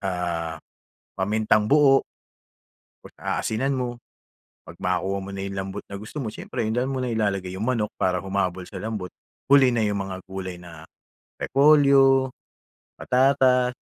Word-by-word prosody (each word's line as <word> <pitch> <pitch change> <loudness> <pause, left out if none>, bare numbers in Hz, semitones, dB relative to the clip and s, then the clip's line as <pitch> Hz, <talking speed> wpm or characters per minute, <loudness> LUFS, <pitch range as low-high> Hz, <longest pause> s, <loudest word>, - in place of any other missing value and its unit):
ah, 85 -4 -3 0.6
pamintang-buo, 110 +8 +3 1.0
tapos - - -14
aasinan 135 +5 -1
mo. 125 -1 -2 0.8
'Pag 80 - -11
makuha 95 +2 0
mo 100 - -8
na 100 - -5
'yong 100 0 -5
lambot 95 +1 -5
na 100 - -6
gusto 110 +9 -7
mo, 120 - -3
siyempre 120 +3 -6
doon 125 +4 -1
mo 130 - -2
na 125 - -2
ilalagay 100 -5 -1
'yong 105 - -3
manok, 115 -4 0
para 90 -1 0
humabol 95 -1 -2
sa - - -10
lambot. 110 -4 -4 0.4
Huli 135 -3 +6
na 120 - 0
'yong 105 -1 0
mga 95 -1 -4
gulay 95 -2 -6
na 80 -3 -12 0.5
repolyo, 135 -2 +4 0.6
patatas, 125 -1 +3
105 Hz, 145 wpm, -24 LUFS, 95-130 Hz, 1.0 s, Huli